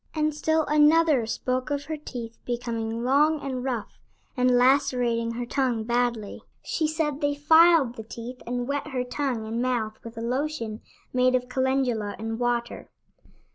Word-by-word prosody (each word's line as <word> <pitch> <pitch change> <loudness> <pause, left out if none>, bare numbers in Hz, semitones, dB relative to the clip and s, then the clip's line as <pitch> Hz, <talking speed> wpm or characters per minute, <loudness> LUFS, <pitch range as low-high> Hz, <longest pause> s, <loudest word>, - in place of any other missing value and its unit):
And 305 0 +1
still 315 +1 +1
another 300 -4 +4
spoke 255 +3 -2
of 285 -1 -2
her 315 - -3
teeth 240 -6 -8
becoming 230 -1 -3
long 295 +5 +3
and 260 -3 -4
rough, 245 -5 -4 0.4
and 250 -1 +3
lacerating 245 -3 +2
her 240 +1 -4
tongue 245 -3 0
badly. 235 -2 -1 0.2
She 315 - -1
said 305 -2 -2
they 290 0 +1
filed 320 -2 +5
the 220 - -6
teeth 235 +3 -8
and 245 0 -2
wet 285 +1 -2
her 260 -4 -2
tongue 250 -3 -2
and 225 +2 -2
mouth 235 -4 -1
with 230 0 -10
a - - -4
lotion 240 -3 -2 0.3
made 255 0 +3
of 250 0 -1
calendula 255 -5 0
and 225 +1 -4
water. 240 -1 -2
250 Hz, 160 wpm, -26 LUFS, 235-290 Hz, 0.4 s, filed